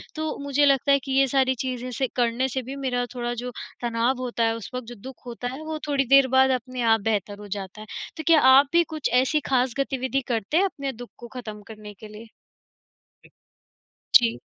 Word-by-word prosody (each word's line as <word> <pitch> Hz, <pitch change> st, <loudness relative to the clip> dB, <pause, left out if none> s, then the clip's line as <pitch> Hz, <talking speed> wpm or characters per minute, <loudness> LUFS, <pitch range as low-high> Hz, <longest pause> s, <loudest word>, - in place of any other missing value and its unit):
तो 315 Hz, 0 st, -3 dB
मुझे 285 Hz, +1 st, +2 dB
लगता 275 Hz, 0 st, +3 dB
है 280 Hz, -, +5 dB
कि 270 Hz, -, -6 dB
ये 270 Hz, +1 st, +4 dB
सारी 260 Hz, 0 st, +2 dB
चीज़ें 255 Hz, -1 st, -4 dB
से 260 Hz, +2 st, -1 dB
करने 245 Hz, +1 st, +1 dB
से 260 Hz, +2 st, -2 dB
भी 265 Hz, +3 st, -7 dB
मेरा 250 Hz, -3 st, -1 dB
थोड़ा 240 Hz, 0 st, -2 dB
जो 250 Hz, 0 st, -5 dB, 0.3 s
तनाव 240 Hz, +2 st, 0 dB
होता 240 Hz, -2 st, -2 dB
है 225 Hz, 0 st, +1 dB
उस 230 Hz, -5 st, -8 dB
वक़्त, 250 Hz, -2 st, -5 dB
जो 240 Hz, -, -8 dB
दुःख 255 Hz, +5 st, -12 dB
होता 245 Hz, 0 st, -5 dB
है, 280 Hz, -, -8 dB
वो 315 Hz, 0 st, -4 dB
थोड़ी 275 Hz, -2 st, +1 dB
देर 275 Hz, -1 st, +7 dB
बाद 265 Hz, 0 st, +6 dB
अपने 255 Hz, +1 st, -7 dB
आप 225 Hz, -, +1 dB
बेहतर 205 Hz, -1 st, -2 dB
हो 210 Hz, -, -10 dB
जाता 195 Hz, +2 st, -8 dB
है। 215 Hz, -, -10 dB, 0.3 s
तो 315 Hz, -, -5 dB
क्या 330 Hz, -2 st, +7 dB, 0.2 s
आप 275 Hz, +1 st, +6 dB
भी 340 Hz, 0 st, +5 dB
कुछ 305 Hz, -, -1 dB
ऐसी 305 Hz, +4 st, +1 dB
खास 255 Hz, -2 st, +2 dB
गतिविधि 270 Hz, 0 st, -1 dB
करते 230 Hz, +4 st, -1 dB
हैं, 385 Hz, -, +4 dB
अपने 280 Hz, -8 st, -4 dB
दुःख 245 Hz, -1 st, -10 dB
को 240 Hz, -, -10 dB
ख़त्म 215 Hz, -3 st, -7 dB
करने 215 Hz, -1 st, -10 dB
के 215 Hz, +2 st, -12 dB
लिए? 210 Hz, +2 st, -12 dB, 1.9 s
जी। 230 Hz, -2 st, +5 dB
255 Hz, 215 wpm, -24 LUFS, 230-275 Hz, 1.9 s, देर